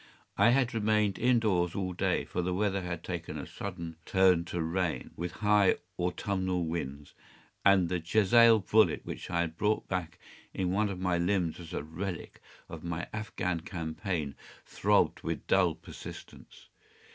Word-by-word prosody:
I - - +5
had 125 0 +2
remained 105 -2 +1
in 125 +1 +4
doors 90 -6 +1
all 95 -2 -2
day, 90 - 0
for - - -2
the 90 +1 -1
weather 100 -1 0
had 85 -2 -5
taken 85 -3 -5
a - - -5
sudden 85 -5 -6
turn 90 -2 +3
to 85 0 -4
rain, 85 +1 -1
with 85 +1 -4
high 105 -2 +5 0.2
autumnal 90 0 -1
winds, 75 -3 -5 0.5
and 100 -3 +5
the 90 +1 -1
jezail 110 +6 +5
bullet 110 +3 +3
which - - -6
I 85 - +1
had 80 -1 -3
brought 105 +1 +1
back 90 -2 -3 0.4
in 90 -2 0
one 105 +2 +1
of 95 -2 -5
my 90 -2 +1
limbs 90 -2 0
as 85 -2 -9
a - - -3
relic 85 +3 -6 0.3
of 80 -2 -9
my 85 0 -4
Afghan 90 -5 -2
campaign, 80 -2 -4 0.3
throbbed - - +2
with - - -4
dull 90 -4 +3
persistency. - - -11
90 Hz, 160 wpm, -30 LUFS, 85-100 Hz, 0.5 s, I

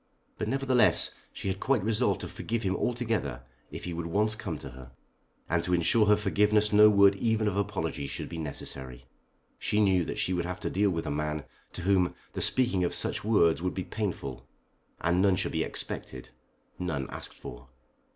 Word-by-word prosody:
But - - -1
nevertheless 135 -2 +3 0.2
she - - -6
had 95 0 -1
quite 130 -4 +1
resolved 115 +3 +1
to - - -4
forgive 115 0 -3
him 95 -1 0
altogether 115 - -1 0.3
if - - -8
he 90 - -4
would 85 0 -4
once 105 +5 +1
come 95 -6 -5
to 70 - -8
her. 65 0 -12 0.5
And 85 -1 +1
to 90 - +1
insure 105 +6 +3
her 105 - +6
forgiveness 105 +1 +2
no 105 +1 +8
word 100 -1 +6
even 110 0 +1
of 100 - 0
apology 95 -8 -2
should - - -5
be 85 - -6
necessary. 65 -4 -6 0.5
She 105 - 0
knew 95 -4 +4
that - - -4
she 95 - 0
would 85 -1 -1
have 90 0 -4
to - - -2
deal 100 +2 +2
with 80 -3 -2
a 75 - -2
man 75 0 -2 0.3
to 90 - -6
whom 95 -1 +2 0.2
the - - -3
speaking 120 -8 +3
of 90 - 0
such - - -2
words 85 -7 +3
would 90 0 -2
be 95 - -2
painful, 90 - -4 0.5
and 90 +2 +2
none 95 -1 +4
should - - -1
be - - 0
expected, 65 -1 -6 0.5
none 80 -7 -2
asked - - -7
for. - - -10
95 Hz, 195 wpm, -29 LUFS, 80-105 Hz, 0.5 s, no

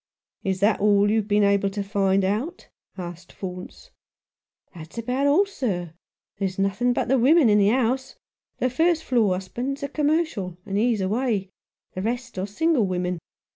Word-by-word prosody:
" - - -53
Is 190 0 -4
that 210 +1 +3
all 205 0 +4
you 220 - +2
have 210 -2 -1
been 205 0 +3
able 200 0 +3
to 200 +1 -4
find 195 -1 +1
out? 235 - -3
" - - -70
asked 175 -1 -8
Faunce. 180 - -8 0.8
"That's 165 +3 -11
about 250 +5 0
all, 325 +8 +4
sir. 185 - -3 0.5
There's 190 -2 -2
nothing 195 +5 +1
but 245 - -1
women 270 +2 +5
in 210 0 +5
the 200 - +4
house. 260 +2 0 0.4
The 255 - 0
first 325 +3 +2
floor's 205 -7 +1
husband 255 +8 -4
is - - -10
a - - -1
commercial, 290 - -1
and 195 - -4
he's 220 0 +2
away; 205 -1 -1 0.4
the 185 - -4
rest 235 0 -3
are 190 - -2
single 275 0 +1
women. 180 -1 -2
210 Hz, 175 wpm, -24 LUFS, 190-255 Hz, 0.8 s, women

